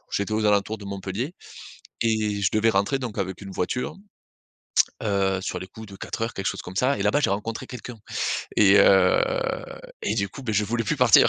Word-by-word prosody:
j'étais 100 +2 -1
aux 110 0 +1
alentours 105 +1 +2
de 100 - -10
Montpellier 100 - -4 0.7
et 110 -2 +1
je 95 - +3
devais 110 +1 +4
rentrer 100 +8 +1
donc 125 -5 -5
avec 95 -1 -3
une 100 - -8
voiture, 110 +8 -2 1.1
heu, 100 -2 +1
sur 90 -2 -3
les 95 - -7
coups 110 +3 -11
de 100 - -11
4:00 115 +1 -3
quelque 95 - -5
chose - - -1
comme 90 - -9
ça 130 +5 +2
et - - -3
là-bas 145 - +3
j'ai - - +2
rencontré 105 +3 -3
quelqu'un 125 -2 -8 0.6
et 100 -1 +7
heu 95 -2 +6 0.8
et - - 0
du 100 - 0
coup, 135 - -10
bah, 115 -4 -2
je 105 0 +2
voulais 115 +2 -1
plus - - 0
partir. - - +7
105 Hz, 200 wpm, -25 LUFS, 95-115 Hz, 1.1 s, et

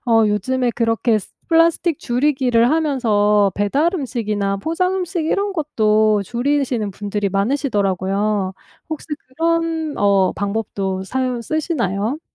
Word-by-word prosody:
어 225 -1 +4
요즘에 245 +5 0
그렇게 230 -1 +1
쓰 - - -12 0.2
플라스틱 330 -1 +3
줄이기를 250 -2 +2
하면서 215 -10 +2
배달 275 - +1
음식이나 215 - -2
포장 350 - 0
음식 355 -3 -2
이런 400 +4 0
것도 215 - +2
줄이시는 245 -3 -1
분들이 205 0 -2
많으시더라고요. 200 -3 0 0.4
혹시 315 -2 -6 0.2
그런 325 +2 -1
어 200 -2 +3
방법도 200 -2 -3
사용 255 +1 -2
쓰시나요? 250 - -2
235 Hz, 295 characters per minute, -19 LUFS, 205-300 Hz, 0.4 s, 어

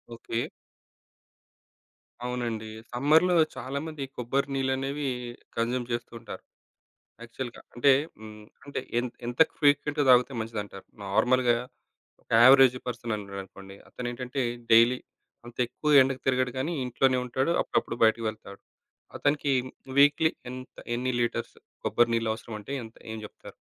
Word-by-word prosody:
Okay. 115 0 -3 1.8
అవునండి. 120 -3 -3 0.3
సమ్మర్‌లో 160 +8 +4 0.2
చాలామంది 140 +3 -5
కొబ్బరి 135 +3 0
నీళ్లనేవి 135 +2 -1 0.5
కన్‌జ్యుమ్ 120 +1 0
చేస్తూ 120 0 -3
ఉంటారు 115 - -9 0.8
యాక్చువల్‌గా. 120 +1 -7
అంటే 130 +3 +5 0.3
హ్మ్, 105 -1 -11 0.2
అంటే 140 - -4 0.2
ఎం 125 - -1 0.2
ఎంత 120 +1 -6 0.2
ఫ్రీక్వెంట్‌గా 145 0 +3
తాగితే 125 +2 +5
మంచిదంటారు? 105 -3 -6 0.2
నార్మల్‌గా, 125 +4 +3 0.7
ఒక - - -22 0.2
అవరేజ్ 130 -1 +7
పర్సన్ 120 -2 -3
ఉన్నాడనుకోండి, 100 -1 -9
అతనేంటంటే, 125 +2 -4 0.3
డైలీ 120 +2 +6 0.5
అంత 120 - -12
ఎక్కువ 150 +2 +4
ఎండకు 130 0 0
తిరగడు 130 -1 +1
కానీ, 165 +6 -1
ఇంట్లోనే 130 +1 +2
ఉంటాడు. 130 +5 0
అప్పుడప్పుడు 115 - -1
బయటికి 110 +1 +2
వెళ్తాడు. 100 -2 -11 0.6
అతనికి 145 -1 +1 0.5
వీక్‌లీ 145 +3 +5 0.2
ఎంత 130 0 -10 0.2
ఎన్ని 130 +1 -1
లీటర్స్ 115 0 -2 0.3
కొబ్బరి 120 0 +3
నీళ్లు 115 -1 0
అవసరం 110 0 -8
అంటే 120 - -9
ఎంత 110 0 -13 0.2
ఏం 110 - -5
చెప్తారు? - - -13
125 Hz, 120 wpm, -27 LUFS, 115-135 Hz, 1.8 s, అవరేజ్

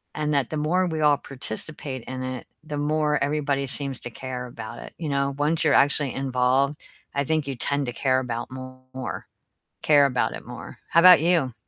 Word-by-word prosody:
and 150 0 -1
that 140 -2 +1
the 155 - -2
more 180 +5 +1
we 160 -2 -3
all 145 -1 +4
participate 135 0 -5
in 130 0 -6
it, 130 -1 -5 0.2
the 150 -2 -5
more 150 0 +1
everybody 145 -1 0
seems 135 -1 0
to 120 - -6
care 125 0 -6
about 110 -2 -8
it, - - -10
you 155 -3 -3
know? 140 0 0
Once 155 +3 +2
you're 150 - +3
actually 140 -1 +4
involved, 135 +2 +1 0.4
I 140 - +1
think 155 0 0
you 135 - -3
tend 140 +2 0
to 120 - -3
care 130 0 +1
about 120 -1 -4
more, 130 -1 -7 0.6
care 145 -2 +5
about 125 -2 0
it - - -8
more. - - -9
How 170 - +5
'bout 180 -4 +9
you? 160 -8 +2
140 Hz, 195 wpm, -24 LUFS, 130-150 Hz, 0.6 s, bout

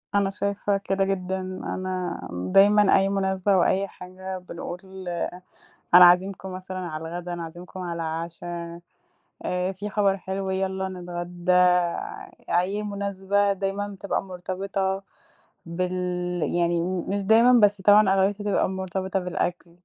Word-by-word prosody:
أنا 200 -1 +3
شايفة 200 0 -1
كده 195 0 0
جدًا، 190 -1 -2
أنا 185 -1 -4
دايمًا 195 - +4
أي 195 0 +2
مناسبة، 190 0 +1
أو 185 -2 +4
أي 195 +1 +1
حاجة 185 0 -8
بنقول 180 0 -7 1.1
أنا 180 0 +11
عازمكم 190 +2 +3
مثلًا 185 0 -7
على 165 -4 -5
الغدا، 175 +1 -5
أنا 175 -1 -4
عازمكم 175 +3 -9
على 175 -2 -4
العشا. 170 +1 -4 0.8
آآ، 180 +1 -1
في 205 +2 -6
خبر 200 -2 +2
حلو 190 0 -4
يالّا 190 0 -1
نتغدى، 175 0 -3 1.1
أي 195 +4 0
مناسبة 200 0 0
دايمًا 195 +1 -2
بتبقى 200 0 -3
مرتبطة 190 +1 -3 0.6
بال 180 +2 -2 0.5
يعني 170 +1 +1 0.3
مش 200 +1 -1
دايمًا، 230 +4 +6
بس 205 -1 +4
طبعًا 205 +1 +6
أغلبيتها 195 +2 +1
بتبقى 205 -2 +1
مرتبطة 190 0 -2
بالأكل. 180 -1 -3
190 Hz, 125 wpm, -25 LUFS, 180-195 Hz, 1.1 s, أنا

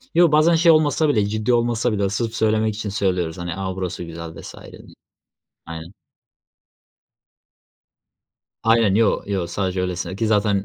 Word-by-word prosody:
Yo, 170 -2 +5
bazen 155 +2 +4
şey 165 0 +5
olmasa 155 0 +2
bile, 105 -7 +2
ciddi 110 +3 -1
olmasa 120 0 +1
bile, 100 -2 0
sırf 115 +2 -3
söylemek 110 -1 +1
için 110 -1 -4
söylüyoruz, 90 -5 -1
hani, 90 -1 -5
"A! 95 -1 -4
Burası 90 -2 -4
güzel" 85 -1 -8
vs. - - -10 0.2
diye. - - -13 0.9
Aynen. 80 +2 -8 2.7
Aynen. 115 -3 +3
Yo, 110 -1 +2
yo, 95 -4 -2
sadece 95 +1 -2
öylesine 90 0 -3
ki 110 +1 -1
zaten 105 -2 +1
105 Hz, 145 wpm, -21 LUFS, 90-115 Hz, 2.7 s, Yo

